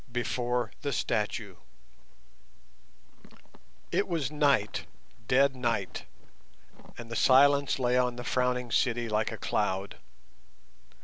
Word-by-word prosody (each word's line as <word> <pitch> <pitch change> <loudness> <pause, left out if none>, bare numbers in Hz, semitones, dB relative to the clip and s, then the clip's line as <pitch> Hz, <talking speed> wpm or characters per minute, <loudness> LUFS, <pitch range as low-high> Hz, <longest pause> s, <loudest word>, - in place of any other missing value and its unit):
BEFORE 120 0 -1
THE 140 -1 -2
STATUE 105 -4 -2 2.3
It 200 - +1
was 160 -7 -2
night—dead 135 -1 0
night—and 115 - -7
the - - -4
silence 140 +3 +4
lay 125 -1 +2
on 125 -1 0
the 120 - -7
Frowning 125 -1 -1
City 120 +1 +1
like 110 +1 0
a 115 - -6
cloud. 100 -2 -2
120 Hz, 90 wpm, -29 LUFS, 110-130 Hz, 2.3 s, silence